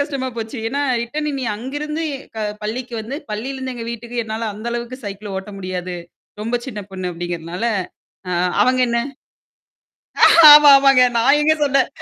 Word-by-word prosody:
கஷ்டமா 275 -2 -2
போச்சு. 225 +2 -5
ஏன்னா 280 +4 -2 0.2
ரிட்டர்ன் 300 +6 -4
நீ - - -3
அங்கிருந்து 295 +7 -4 0.3
க - - -4 0.3
பள்ளிக்கு 240 +3 -5
வந்து 230 +6 -6 0.2
பள்ளியிலருந்து 260 +4 -5
எங்க 230 - -6
வீட்டுக்கு 235 +1 -5
என்னால 220 +1 -4
அந்த 215 +3 -9
அளவுக்கு 240 +2 -5
சைக்கிள் 200 0 -7
ஓட்ட 190 +2 -6
முடியாது. 185 -1 -5 0.5
ரொம்ப 230 +3 -1
சின்ன 215 -6 -6
பொண்ணு 185 -1 -4
அப்படிங்கிறதுனால. 175 +3 -5 0.6
அ - - -2 0.3
அவங்க 255 0 +2
என்ன? 235 0 0 1.5
ஆமா. 295 -1 +9
ஆமாங்க. 275 -2 +5
நான் 265 +5 +4
எங்க 310 +1 +4
சொன்னேன். 275 -2 +2
235 Hz, 150 wpm, -19 LUFS, 210-270 Hz, 1.5 s, ஆமா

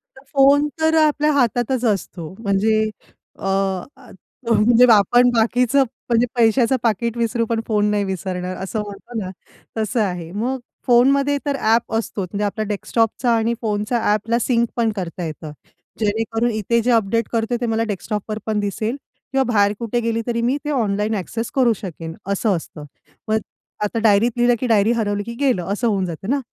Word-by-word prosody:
तर 265 - -16
फोन 280 +1 +5
तर 320 0 +2
आपल्या 300 0 +2
हातातच 245 -1 +1
असतो. 185 -6 -2
म्हणजे 215 +1 +1 0.5
अ, - - -7 1.1
म्हणजे 230 +2 +5
आपण 240 +4 +5
बाकीचं 245 +4 +3 0.3
म्हणजे 235 0 +3
पैशाचं 235 +2 +3
पाकीट 235 +1 0
विसरू 230 0 0
पण 225 0 -1
फोन 210 -2 +1
नाही 205 -1 +1
विसरणार, 185 -1 -4
असं 210 +3 -3
म्हणतो 205 +4 -9
ना, 190 -3 -4 0.5
तसं 220 +2 -1
आहे. 180 -5 -3
मग 240 +7 -2 0.3
फोनमध्ये 275 +4 +4
तर 285 -1 0
ॲप 225 +1 +2
असतो, 225 -2 -2
म्हणजे 200 +3 -3
आपला 215 +2 -2
डेस्कटॉपचा 225 +3 0
आणि 225 +1 +1
फोनचा 210 +1 -1
ॲपला 220 +3 +1
सिंक 235 -1 +1
पण 230 -2 +1
करता 180 -2 -5
येतं. 155 -1 -7 0.5
जेणेकरून 225 +2 0
इथे 220 +2 0
जे 245 +2 +1
अपडेट 230 0 +1
करते, 230 +1 0
ते - - 0
मला 225 -1 0
डेस्कटॉप 210 0 -4
पण 215 -1 0
दिसेल 210 +4 -2 0.4
किंवा 270 0 +2
बाहेर 205 -1 +3
कुठे 235 0 -1
गेली 230 0 -1
तरी 235 -1 -1
मी 250 +4 +1
ते - - -2
ऑनलाईन 215 -4 0
ॲक्सेस 225 +4 -4
करू 250 -4 +4
शकेन, 165 -5 -7
असं 200 +1 +1
असतं. 155 -2 -10 0.4
मग 220 0 +2 0.5
आता 210 +2 -1
डायरीत 220 +1 +4
लिहिलं, 240 0 +4
की 255 - -1
डायरी 220 -1 +3
हरवली 205 -3 -1
की 235 +2 -7
गेलं. 255 -11 +1
असं 235 +4 -1
होऊन 195 -4 +1
जातं 175 +3 -6
ना? 280 +2 +2
225 Hz, 170 wpm, -20 LUFS, 205-240 Hz, 1.1 s, फोन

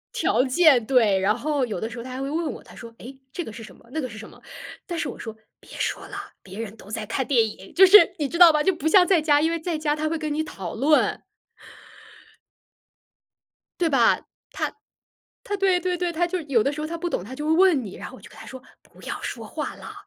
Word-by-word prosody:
条 255 - +2
件， 265 -4 +4
对。 220 -7 +3
然 210 +5 +1
后 285 0 -1
有 210 -7 -5
的 220 - -3
时 235 - -9
候 235 - -6
他 255 - -8
还 255 +1 -6
会 275 - -3
问 320 +2 -2
我， - - -11
他 - - -16
说： 235 - -10
“诶， 265 +3 -11
这 350 - -4
个 - - -8
是 225 +2 -10
什 220 - -13
么， - - -22
那 315 - -3
个 255 - -3
是 215 - -10
什 220 - -10
么？” - - -18 0.5
但 345 -2 -4
是 - - -2
我 - - -9
说： 225 -1 -7 0.2
“别 - - -20
说 - - -3
了， - - -9 0.3
别 190 +1 -12
人 225 -1 -6
都 205 - -15
在 220 0 -4
看 260 +4 -3
电 235 -5 +3
影。” 195 -3 -10
就 380 +2 +8
是 375 -2 +7
你 290 -3 -2
知 335 - -4
道 345 -2 +8
吧， 300 0 +2
就 380 - +2
不 315 -1 -3
像 365 +1 +6
在 355 -3 +3
家， 295 -1 +3
因 320 +2 +1
为 335 - -2
在 330 0 -3
家 305 -1 0
他 310 +1 -2
会 330 - -1
跟 305 -2 -3
你 310 - -1
讨 195 - -6
论。 295 +6 +2 2.6
对 340 - +2
吧， 275 - +3 0.3
他 - - -3 0.7
他 410 - -3
对 380 -2 +2
对 360 0 -1
对， 350 -1 -2
他 345 +2 0
就 365 +2 -3
是 330 - -7
有 235 -6 +3
的 280 - 0
时 300 - -6
候 305 - -3
他 335 +1 -5
不 345 +1 -4
懂， 180 - -2
他 255 +5 -9
就 295 +3 -5
会 315 - +2
问 330 -7 +4
你， 195 - -9
然 - - -8
后 - - -12
我 - - -16
就 - - -12
跟 - - -16
他 - - -11
说： 260 -1 -10 0.2
“不 - - -20
要 - - -5
说 - - -6
话 - - -5
了， - - -10
295 Hz, 285 characters per minute, -24 LUFS, 235-335 Hz, 2.6 s, 就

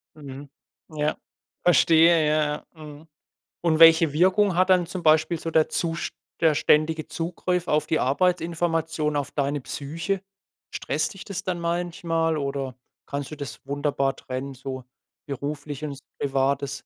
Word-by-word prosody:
Mhm, 140 -1 -10 0.5
ja. 150 0 0 0.5
Verstehe, 165 -2 +5
ja, 150 -1 0
ja. 155 - -12
Mhm. 150 +1 -11 0.6
Und 160 -2 +2
welche 165 -2 +7
Wirkung 190 +4 +3
hat 185 +1 +3
dann 180 -2 +4
zum 180 0 -6
Beispiel 160 +1 +3
so 165 - -4
der 160 -1 +3
zust 165 0 -2 0.3
der 160 -2 +4
ständige 155 +2 +2
Zugriff 180 +1 -2
auf 150 0 +2
die 160 - +1
Arbeitsinformation, 165 0 0
auf 145 - -2
deine 145 0 -1
Psyche? 160 +9 -4 0.5
Stresst 155 +5 -2
dich 195 - -10
das 200 - -5
dann 175 -2 -2
manchmal 170 -1 -1
oder 140 -3 -3 0.3
kannst 140 -1 -4
du 155 - -7
das 140 -2 -7
wunderbar 140 -1 -1
trennen, 130 +1 -6
so 130 0 -7 0.4
beruflich 145 +1 -5
und 140 -2 -5 0.2
Privates? 135 0 0
155 Hz, 140 wpm, -25 LUFS, 140-170 Hz, 0.6 s, welche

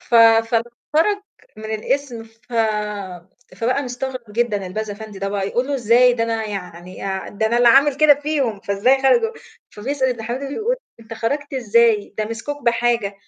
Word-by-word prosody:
ف 240 - -5
فخرج 235 - +3 0.3
من 215 - -10
القِسم 245 +1 -2
ف 225 +2 -21 1.0
فبقى 250 +5 0
مستغرب 250 -3 -6
جدًا 210 -4 -1
الباز 215 +3 -4
أفندي 205 -1 -8
ده 195 0 -2
بقى 200 -1 -2
يقول 245 +4 -1
له: 285 - 0
"إزاي؟ 245 0 +4
ده 230 -1 0
أنا 225 -1 -2
يعني 180 -3 -7
آع 190 -1 -3
ده 220 +2 -1
أنا 235 - +1
اللي 240 0 +6
عامل 275 +3 +5
كده 305 -1 +6
فيهم، 280 -8 -2
فإزاي 245 +7 +2
خرجوا؟" 450 - +3 0.4
فبيسأل 260 +5 -2
ابن 240 -3 -3
حميدو 250 +5 -4
بيقول: 445 - -1 0.2
"أنت 225 0 -9
خرجت 285 +6 -3
إزاي؟ 230 -4 +2
ده 215 - +1
مسكوك 230 +7 -6
بحاجة!" 235 -3 +1
235 Hz, 165 wpm, -20 LUFS, 215-265 Hz, 1.0 s, اللي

